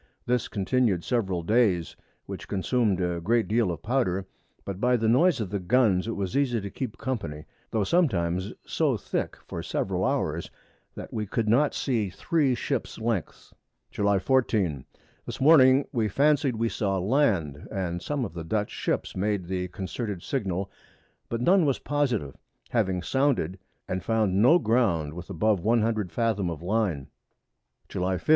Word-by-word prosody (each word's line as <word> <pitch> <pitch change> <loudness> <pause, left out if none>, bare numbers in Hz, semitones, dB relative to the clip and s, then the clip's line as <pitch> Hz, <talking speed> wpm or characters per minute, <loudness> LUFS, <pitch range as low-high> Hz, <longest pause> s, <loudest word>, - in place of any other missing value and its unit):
This 125 -1 0
continu'd 100 -3 +1
several 95 -8 -1
Days, 100 -4 +2 0.3
which - - -7
consumed 105 0 +1
a 90 -2 -1
great 115 +5 +1
deal 110 -3 +2
of 85 - -7
Powder, 105 -6 0 0.4
but 100 0 -5
by 125 0 +3
the 110 -1 0
Noise 155 +7 +4
of 95 -4 -4
the 100 - -1
Guns 100 -1 +2
it 115 - -2
was 95 -2 -3
easy 130 -4 +2
to 100 -1 -6
keep 125 -5 -5
Company, 85 - -4 0.2
tho' 110 -2 0
sometimes 95 - +1
so - - +1
thick - - -3
for - - -5
several - - -2
Hours, - - -1 0.5
that - - -8
we 105 -2 -2
could 110 +2 -1
not 135 +7 +3
see 115 -7 0
three 135 - +1
Ships 130 -1 -3
Lengths. 110 -6 -3 0.4
July 100 -1 +2
14. 95 - +1 0.4
This - - -6
Morning 135 -2 +6
we 115 -5 +1
fancied 140 +3 +2
we 115 +1 0
saw 100 -4 -1
Land, 95 - +1
and 90 -4 -3
some 145 0 -2
of 100 - -8
the 85 -1 -6
Dutch 105 +5 -1
Ships - - -2
made 100 -1 -1
the 90 0 -2
concerted 95 +1 -5
Signal, 100 -7 -2 0.6
but 115 0 -2
none 180 +6 +4
was 140 -4 +2
positive, 125 - -1 0.4
having 95 -6 0
sounded, 130 - 0 0.3
and 90 -1 -3
found 105 -4 +1
no 155 +10 +7
Ground 105 - +1
with 90 +1 -9
above 105 +4 +1
100 110 -2 +1
Fathom 110 -6 0
of 85 -1 -6
Line. 95 -8 0 0.8
_July 95 +1 -1
15. 90 - -8
105 Hz, 160 wpm, -27 LUFS, 90-125 Hz, 0.8 s, no